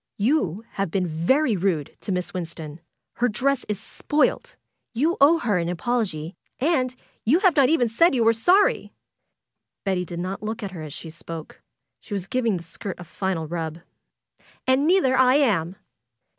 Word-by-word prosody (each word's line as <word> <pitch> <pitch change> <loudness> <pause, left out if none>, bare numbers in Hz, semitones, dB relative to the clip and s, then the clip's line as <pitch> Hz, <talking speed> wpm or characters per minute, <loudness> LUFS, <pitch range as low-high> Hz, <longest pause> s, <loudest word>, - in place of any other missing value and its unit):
"You 215 - 0
have 195 -2 -2
been 185 +2 0
very 205 - +2
rude 175 -6 -1
to - - -5
Miss 180 -1 -2
Winston. 165 -3 -6 0.4
Her 245 +1 +2
dress 265 +4 0
is 210 -2 -2
spoiled. 305 - -1 0.4
You 310 +9 +2
owe 305 +4 +7
her 215 - 0
an 170 0 -1
apology, 180 -4 -2 0.2
and 255 -3 +1 0.3
you 265 +9 +4
have 370 -7 +4
not 275 -3 +5
even 300 -7 +3
said 270 +8 +3
you 240 - +2
were 225 0 +5
sorry!" 360 - +3 0.9
Betty 190 -2 0
did 170 -1 -7
not 185 +3 -4
look 220 +1 -4
at 200 - -4
her 175 -4 -8
as 155 -1 -7
she 160 - -8
spoke. 165 -1 -9 0.4
She 205 - -6
was 190 -3 -3
giving 230 -2 0
the 170 - -8
skirt 175 +3 -7
a - - -7
final 175 -1 -3
rub. 160 -1 -4 0.9
"And 260 +3 +3
neither 340 -8 +4
I 255 0 +5
am 195 - +2
210 Hz, 170 wpm, -24 LUFS, 175-260 Hz, 0.9 s, owe